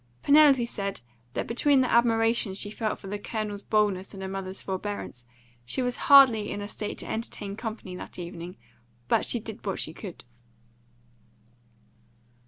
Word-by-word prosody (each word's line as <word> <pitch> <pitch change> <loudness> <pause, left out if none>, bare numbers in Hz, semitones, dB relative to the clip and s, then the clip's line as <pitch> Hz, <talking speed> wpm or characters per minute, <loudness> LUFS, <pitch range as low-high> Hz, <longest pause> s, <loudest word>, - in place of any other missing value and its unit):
Penelope 285 -4 +6
said 200 - -4 0.3
that - - -1
between 270 +3 +3
the 255 - 0
admiration 225 -3 +3
she 205 +1 -3
felt 215 0 -2
for - - -14
the 205 +1 -4
Colonel's 210 -1 -4
boldness 205 -3 0
and 190 - -7
her - - -3
mother's 190 0 -5
forbearance, 190 -10 -5 0.4
she 185 - -1
was 245 0 -1
hardly 260 -7 +8
in - - -4
a 205 - -5
state 210 0 -5
to - - -6
entertain 210 -3 -5
company 215 -5 -6
that - - -9
evening; 175 0 -7 0.5
but - - +2
she 240 - +1
did 220 -1 -8
what 195 - -2
she 155 - -2
could. 185 0 -9
210 Hz, 160 wpm, -27 LUFS, 195-235 Hz, 0.5 s, hardly